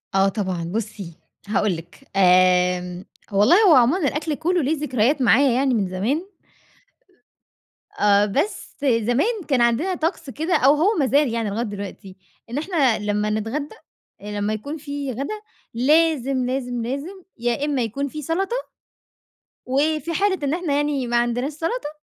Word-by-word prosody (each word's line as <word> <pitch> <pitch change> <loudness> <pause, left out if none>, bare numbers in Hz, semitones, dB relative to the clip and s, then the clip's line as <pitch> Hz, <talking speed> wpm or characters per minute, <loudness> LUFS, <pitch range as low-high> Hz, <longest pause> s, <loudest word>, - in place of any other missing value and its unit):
آه 195 0 +4
طبعًا، 190 -4 -3
بُصّي 205 -6 -5 0.3
هاقول 205 -2 +1
لِك، 175 +11 -14
آمم 180 -1 +3 0.3
والله 205 - +5
هو 330 - +7
عمومًا 275 +7 +3
الأكل 300 +2 -2
كلّه 345 +4 0
ليه 305 +4 0
ذكريات 260 0 +1
معايا 255 +2 +4
يعني 265 +1 +1
من 205 -5 +1
زمان 230 - -2 1.7
آآ 205 0 +4
بس 285 - -2
زمان 265 - +1
كان 265 -5 +2
عندنا 245 +11 +2
طَقس 320 -2 -3
كده، 320 - -1
أو 270 +2 +5
هو 365 +8 +2
مازال 285 +1 +3
يعني 230 -2 -1
لغاية 215 +4 -2
دلوقتي، 200 -2 -8 0.3
إن 240 - -4
إحنا 295 - +1
لمّا 210 0 -1
نتغدى 225 - -3 0.5
آآ - - -12
لمّا 205 +1 -1
يكون 285 +9 -5
في 285 -2 -5
غدا 280 - -5 0.3
لازم، 275 0 +2
لازم، 250 -1 -2
لازم، 305 +10 -5
يا 240 +4 -1
إمّا 285 -3 0
يكون 245 +5 -2
في 305 +2 -7
سلطة 390 - -2 1.0
وفي 305 +5 0
حالة 390 +2 +1
إن 280 +1 0
إحنا 340 -4 -1
يعني 290 -3 0
ما 240 0 +1
عندناش 240 +4 0
سلطة، 330 +5 -3
265 Hz, 150 wpm, -22 LUFS, 215-305 Hz, 1.7 s, هو